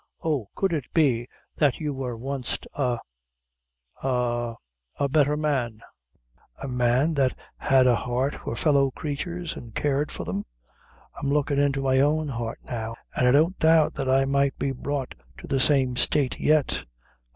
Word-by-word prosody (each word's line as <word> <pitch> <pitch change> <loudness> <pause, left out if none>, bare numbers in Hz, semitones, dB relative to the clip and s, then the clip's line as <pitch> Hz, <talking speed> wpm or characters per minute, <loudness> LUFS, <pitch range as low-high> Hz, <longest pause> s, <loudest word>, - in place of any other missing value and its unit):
Oh, 145 -11 -1
could 190 -3 0
it 145 -6 -1
be 125 -7 +3 0.3
that 145 -5 +3
you 150 -3 -2
wor 130 -3 -4
wanst 135 +1 -4
a 125 -4 0 1.0
a 120 -2 -1 0.4
a 140 - 0
betther 145 +1 +2
man 135 -8 -1 0.8
a - - -6
man 125 +4 +2
that 135 -3 +1 0.2
had 130 -1 +4
a 125 -1 +5
heart 125 +5 -1
for - - -3
fellow 140 0 +3
creatures, 165 +5 -4
and 115 -2 -10
cared 145 0 0
for - - -5
them? 95 +4 -3 0.8
I'm 140 - -1
lookin' 145 0 +1
into 140 -1 +1
my 130 0 +3
own 150 +2 +2
heart 115 -3 -4
now, 115 -2 -4 0.2
and 125 - +2
I - - +6
don't 160 +7 +3
doubt 160 -1 +4
but 135 -2 -3
I 135 +1 +4
might 140 0 +1
be 140 - -1
brought 135 0 -3 0.2
to - - -10
the 135 - 0
same 130 -2 +3
state 135 +1 +2
yet. 155 -2 +2
135 Hz, 160 wpm, -25 LUFS, 125-145 Hz, 1.0 s, I